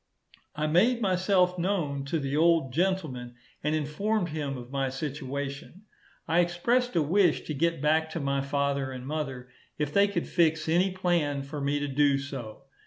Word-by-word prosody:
I 150 +1 -1
made 200 +11 +3
myself 185 -2 +2
known 165 -7 -1
to 150 +4 -1
the 140 -2 -2
old 160 -4 +3
gentleman, 155 -9 -1 0.3
and 150 +1 +1
informed 175 +6 -1
him 145 -3 -3
of 125 0 -10
my 135 -1 0
situation; 140 +4 -5 0.4
I 165 +2 +3
expressed 210 +8 +1
a 165 - +3
wish 175 +2 +3
to 155 - -5
get 165 0 0
back 160 +1 +2
to 170 - -2
my 140 -1 0
father 140 -1 -1
and 130 -1 -7
mother, 135 -4 -4 0.3
if 150 -1 -2
they 200 0 +5
could 200 - -2
fix 160 -3 +2
any 175 +4 +3
plan 170 -7 0
for 145 +1 -6
me 140 +1 0
to 145 - -2
do 140 0 +3
so. 135 -6 -7
150 Hz, 175 wpm, -28 LUFS, 140-175 Hz, 0.4 s, they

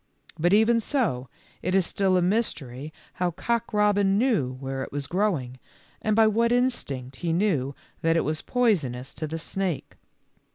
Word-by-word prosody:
But 175 +3 +3
even 220 +3 +5
so, 210 - -1 0.3
it 185 +2 0
is 190 -2 +4
still 190 -1 +2
a 180 - +2
mystery 155 - -1 0.3
how 180 - +3
Cock 235 +7 -2
robin 205 -2 +3
knew 210 - +1
where 135 +1 -5
it - - -5
was 145 0 -3
growing, 145 -8 -1 0.4
and 215 -1 +1
by 225 0 +6
what 230 +2 +2
instinct 140 - 0
he 170 +3 -2
knew 160 -7 +1 0.3
that 165 0 +3
it - - +3
was 155 0 -1
poisonous 140 - 0
to 155 - -4
the 160 +2 -4
snake. 180 0 -3
180 Hz, 165 wpm, -26 LUFS, 140-215 Hz, 0.4 s, by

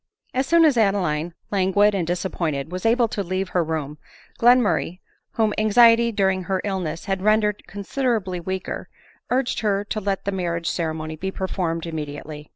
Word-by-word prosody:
As 260 +1 0
soon 335 +1 +5
as 290 -6 +3
Adeline, 175 -6 +1 0.2
languid 200 +1 +3
and 180 -4 -1
disappointed, 170 -5 -2
was 185 +4 -2
able 235 +1 +3
to 205 - -3
leave 185 0 -3
ber 175 - +3
room, 155 -2 -4 0.4
Gienmurray, 230 -8 +3 0.3
whom 220 -2 +1
anxiety 230 +2 +5
during 190 -3 +1
her 190 +1 0
illness 180 -5 -3
had 195 -1 -2
rendered 210 0 +1
considerably 205 -2 -2
weaker, 190 +2 -5 0.4
urged 255 0 0
her 205 -2 0
to 215 +1 -3
let 195 -1 -2
the 200 - 0
marriage 170 -3 -2
ceremony 160 -2 -3
be 190 +4 -3
performed 180 -4 -3
immediately. 150 -1 -6
190 Hz, 160 wpm, -23 LUFS, 170-215 Hz, 0.4 s, soon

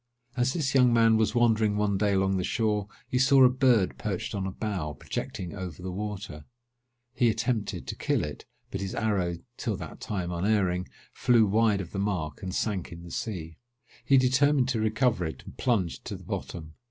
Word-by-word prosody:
As 125 +1 +1
this 150 -6 -1
young 125 -2 +5
man 115 -1 +5
was 110 +2 +1
wandering 110 -3 +3
one 105 -1 +1
day 105 -2 +2
along 95 0 +2
the 90 - -1
shore, 105 -2 0 0.2
he 125 - 0
saw 135 0 +6
a 125 - +8
bird 125 -6 +2
perched - - -3
on 95 -1 -2
a - - -3
bough, 95 -7 -3
projecting 85 +5 -5
over 90 -3 -7
the 95 - -4
water. 100 -5 -5 0.7
He 120 -2 +3
attempted 110 -1 -1
to - - -5
kill - - 0
it; - - -6 0.3
but - - -3
his 95 -1 -4
arrow, 95 -6 0 0.2
till - - -2
that - - -8
time 90 -4 -3
unerring, 90 0 +1 0.3
flew 120 -3 +4
wide 105 0 +2
of 85 - -8
the 100 - -3
mark, 90 -5 -2
and 95 -2 -4
sank 95 -1 -2
in 85 0 -9
the 85 - -10
sea. 80 -7 -5 0.4
He 135 - +5
determined 130 +1 +3
to 120 -4 0
recover 110 -2 +1
it, 80 -1 -5
and - - -11
plunged 105 -9 0
to - - -4
the - - -11
bottom. 80 -3 -6
105 Hz, 195 wpm, -28 LUFS, 90-120 Hz, 0.7 s, a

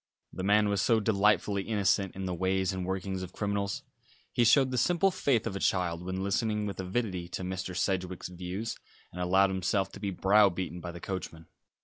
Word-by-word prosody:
The - - -5
man 105 +2 +4
was 100 -2 +1
so 115 -1 +3
delightfully 105 -1 +2
innocent 100 -2 +1
in 95 0 -4
the 90 - -2
ways 95 +2 0
and 90 -1 -4
workings 95 0 -3
of 90 0 -7
criminals. 100 -1 -2 0.5
He 120 - +3
showed 130 +3 +5
the 125 - -1
simple 175 +7 +3
faith 130 -10 +1
of 110 -4 -3
a - - -3
child 85 -3 0
when 95 +1 -3
listening 105 +2 0
with 100 -2 -5
avidity 95 -2 -2
to 90 - -5
Mr. 95 0 -4
Sedgewick's 90 -1 -1
views, 90 +5 -5 0.4
and 90 - -6
allowed 95 +2 +4
himself 95 +1 0
to - - -10
be 100 0 -2
browbeaten 95 -2 +2
by 85 +1 -5
the 85 - -9
coachman. 85 -4 -5
95 Hz, 195 wpm, -30 LUFS, 90-105 Hz, 0.5 s, showed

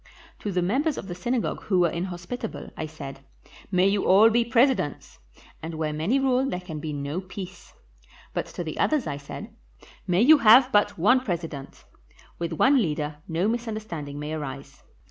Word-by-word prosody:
To 205 - -3
the 180 -1 0
members 275 - 0
of - - -6
the 175 - -5
synagogue 235 +7 -2
who 190 -3 +2
were 170 -2 +3
inhospitable, 180 +6 -5
I 160 - -4
said, 140 -3 -9 0.5
'May 185 0 +4
you 200 0 +1
all 210 +5 +7
be 235 +1 +3
presidents,' 235 - +1 0.4
and 160 +1 -6
where 155 -1 -2
many 165 - +1
rule 265 0 +2
there 180 - -2
can 170 -4 -7
be 155 +1 -4
no 145 +4 -3
peace; 185 0 -10 0.6
but - - -2
to 175 - -6
the 155 -2 -6
others 305 -4 +2
I 145 -2 -3
said, 140 -1 -9 0.5
'May 180 +4 +3
you 305 +3 +7
have 250 +3 +7
but 205 0 +2
one 215 +10 +4
president'; 165 - -5 0.5
with 170 -1 -2
one 265 - +4
leader 150 -4 -2
no 170 +4 0
misunderstanding 215 -11 -4
may 150 +1 -4
arise. 140 -2 -7
180 Hz, 175 wpm, -25 LUFS, 155-230 Hz, 0.6 s, all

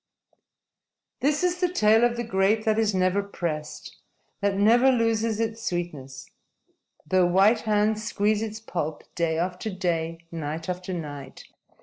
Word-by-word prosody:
_This 295 +4 +1
is 360 0 +1
the 360 -1 +2
tale 220 -7 +4
of 240 0 +2
the 240 - -2
grape 210 0 +1
that 220 0 +2
is 215 -3 +1
never 185 +2 +2
pressed, 165 -6 -5 0.4
that 200 -1 0
never 235 +6 +5
loses 230 -2 +1
its 225 0 -2
sweetness, 145 - -5 0.8
though 180 +3 +3
white 195 +6 +4
hands 215 +1 +2
squeeze 210 0 0
its 220 -1 -4
pulp, 165 -8 -4
day 165 -2 0
after 180 +5 -2
day, 170 -3 -2
night 160 0 -5
after 180 +1 -4
night. 145 -6 -7
200 Hz, 140 wpm, -25 LUFS, 170-220 Hz, 0.8 s, never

